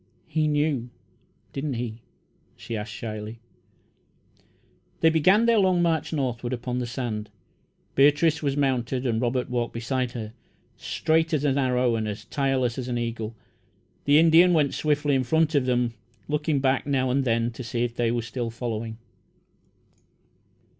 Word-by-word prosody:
"He 155 -1 0
knew, 145 -5 0 0.6
didn't 140 -1 -3
he?" 115 -1 -5 0.5
she 115 - -6
asked 105 +1 -5
shyly. 110 0 -6 1.6
They 160 - +5
began 185 +8 +4
their 230 -2 +4
long 185 -3 +3
march 160 -3 0
northward 125 -5 -2
upon 125 0 -3
the 125 - -3
sand. 115 -4 -4 0.6
Beatrice 150 +3 +4
was 140 -2 -1
mounted, 130 -2 0
and 115 -2 0
Robert 125 +1 0
walked 120 -2 -2
beside 125 +1 -2
her. 110 -2 -6 0.4
Straight 160 0 0
as 145 - -1
an 140 -1 +2
arrow 125 -2 +2
and 110 -1 -2
as 105 0 -5
tireless 130 -2 0
as 125 - -4
an 120 -1 -2
eagle, 115 -1 -3 0.7
the 145 +1 +5
Indian 165 +2 +6
went 150 -4 +2
swiftly 150 -1 +1
in 130 -1 +2
front 160 +5 +2
of 140 -3 +2
them, 125 -2 +1 0.3
looking 150 -1 0
back, 135 0 +1
now 130 -2 +1
and 135 +2 +2
then, 115 -1 +1
to 120 +2 -8
see 115 0 -2
if 120 -1 -2
they 120 -1 +1
were 120 -1 -1 0.3
following. 115 -1 -4
130 Hz, 155 wpm, -25 LUFS, 120-150 Hz, 1.6 s, Indian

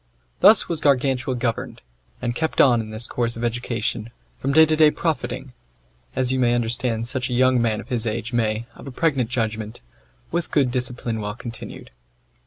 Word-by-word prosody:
Thus 210 +2 +6
was 165 -2 -3
Gargantua 135 -2 +1
governed, 120 - -3 0.4
and 120 -1 0
kept 160 +6 -2
on 120 -4 +5
in 110 - -8
this 110 +2 -1
course 120 -1 -1
of 115 - -5
education, 115 -2 -2 0.3
from 135 - -1
day 160 +3 +7
to 155 0 +1
day 155 -1 +6
profiting, 150 -5 -3 0.6
as 130 -1 +1
you 130 - 0
may 120 -1 +3
understand 115 -1 0
such 125 0 -1
a 125 - -1
young 130 0 +4
man 110 -2 0
of 115 - -10
his 120 -3 -1
age 115 +2 -3
may, 110 -1 0
of - - -12
a - - -6
pregnant 135 -4 0
judgment, 110 -3 -3 0.5
with 170 -1 -1
good 135 -5 +2
discipline 125 -3 -2
well 105 0 -4
continued. 115 -1 -9
120 Hz, 185 wpm, -22 LUFS, 115-130 Hz, 0.6 s, day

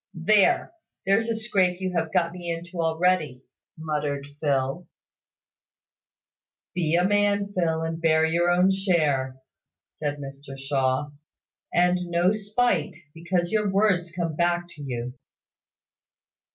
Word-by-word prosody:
"There! 200 - +3 0.3
There's 220 +4 +2
a 230 - 0
scrape 190 -5 +1
you 185 -1 -3
have 165 -1 -1
got 170 -2 +1
me 175 -1 -5
into 170 +1 -5
already!" 160 -5 0 0.3
muttered 150 -3 -3
Phil. 140 +3 -1 1.9
"Be 170 -2 +1
a 175 +1 +3
man, 205 0 +1
Phil, 165 -3 0
and 165 0 -4
bear 160 -1 +3
your 170 +2 +1
own 180 +2 +4
share," 155 -9 0 0.5
said 145 -1 -4
Mr 140 0 -9
Shaw; 135 +1 -1 0.6
"and 180 +1 +3
no 175 +2 +2
spite, 210 -6 0 0.2
because 175 +1 -2
your 210 -2 +1
words 190 -3 +2
come 170 -3 -3
back 175 +1 0
to 150 - -12
you!" 125 -3 -4
170 Hz, 125 wpm, -25 LUFS, 150-185 Hz, 1.9 s, own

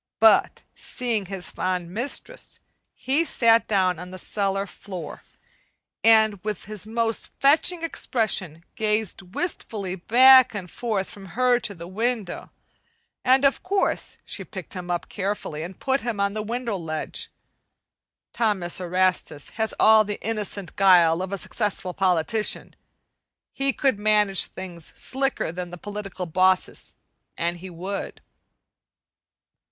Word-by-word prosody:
But - - +4
seeing 230 -6 -2
his 190 -2 -5
fond 180 -2 -2
mistress, 280 - -5 0.4
he 275 +5 +1
sat 230 -7 +3
down 185 -4 +2
on 180 +1 -8
the 185 - -8
cellar 195 0 -1
floor, 190 -2 -8 0.8
and 220 -3 +5
with 210 -2 -4
his 210 0 -8
most 225 0 -1
fetching 320 +5 +4
expression 210 - -1
gazed 210 -4 -1
wistfully 210 - -3
back 255 +6 +6
and 180 -4 -6
forth 215 -5 -2
from 195 -1 -11
her 250 -1 +4
to 205 -4 -6
the 170 -1 -9
window. 220 +1 -3 0.7
And 260 +2 +4
of 275 - +3
course 390 +2 -1
she - - -3
picked - - -8
him 180 -2 -6
up 175 -1 -2
carefully 195 -6 -3
and 175 +3 -8
put 270 +1 0
him 235 -4 -3
on 200 0 +1
the 215 - -3
window 230 -1 -3
ledge. 155 -3 -4 1.0
Thomas 195 -7 0
Erastus 180 -4 0
has 220 0 -1
all 220 0 +7
the 210 -1 -5
innocent 210 -4 -3
guile 180 -4 +5
of 190 +1 -4
a 200 - -2
successful 195 -2 -2
politician. 190 +3 0 0.8
He 275 0 0
could 265 -6 0
manage 210 -2 +3
things 175 -4 -8
slicker 270 -9 -1
than 180 +1 -6
the 175 - -8
political 195 -1 -6
bosses, 185 +2 +1 0.4
an' 170 +1 -1
he 185 +2 -9
would. 185 +3 -5
200 Hz, 135 wpm, -24 LUFS, 185-230 Hz, 1.0 s, all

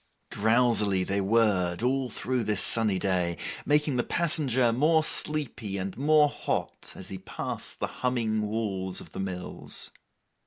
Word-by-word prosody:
Drowsily 110 -3 +2
they 100 +2 -1
whirred 95 -3 +1
all 130 0 0
through 125 +1 -2
this 105 -2 +2
sunny 110 -4 +3
day, 90 -3 0 0.3
making 150 -2 +2
the 120 - +1
passenger 130 -8 +2
more 155 +6 +3
sleepy 140 -11 0
and 95 0 -4
more 150 +2 +4
hot - - -4
as - - -8
he 95 - -6
passed - - -5
the - - 0 0.2
humming 115 -4 0
walls 100 -4 -2
of - - -12
the - - -8
mills. 90 -2 -3
110 Hz, 145 wpm, -27 LUFS, 95-130 Hz, 0.3 s, more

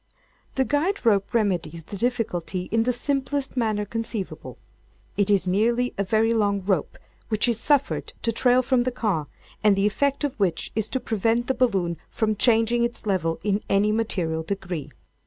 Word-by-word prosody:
"The 265 - +2
guide 300 +4 0
rope 200 -3 +3
remedies 180 -7 0
the 200 - -8
difficulty 200 -6 -1
in 225 +1 +3
the - - +5
simplest 275 +2 -1
manner 215 -4 0
conceivable. 225 -2 -5 0.6
It 205 -1 +1
is 200 -2 +3
merely 235 +6 +1
a 200 - 0
very 220 +3 +2
long 200 -3 +1
rope 190 -7 0 0.3
which 215 +1 +2
is 235 -2 +1
suffered 285 -2 +1
to 230 - +1
trail 250 +2 +3
from 255 0 +2
the 255 +1 0
car, 205 - -1 0.4
and 210 -2 +5
the 195 +1 +1
effect 280 +7 0
of 285 -3 0
which 180 -5 0
is 220 -1 -1
to 260 - -2
prevent 225 +1 0
the 265 - +1
balloon 190 -10 +1
from 215 -1 0
changing 230 +2 +3
its 235 -1 -2
level 170 -5 0
in 205 0 +1
any 200 +2 +3
material 180 -8 -1
degree. 175 -4 -4
215 Hz, 175 wpm, -24 LUFS, 195-240 Hz, 0.6 s, the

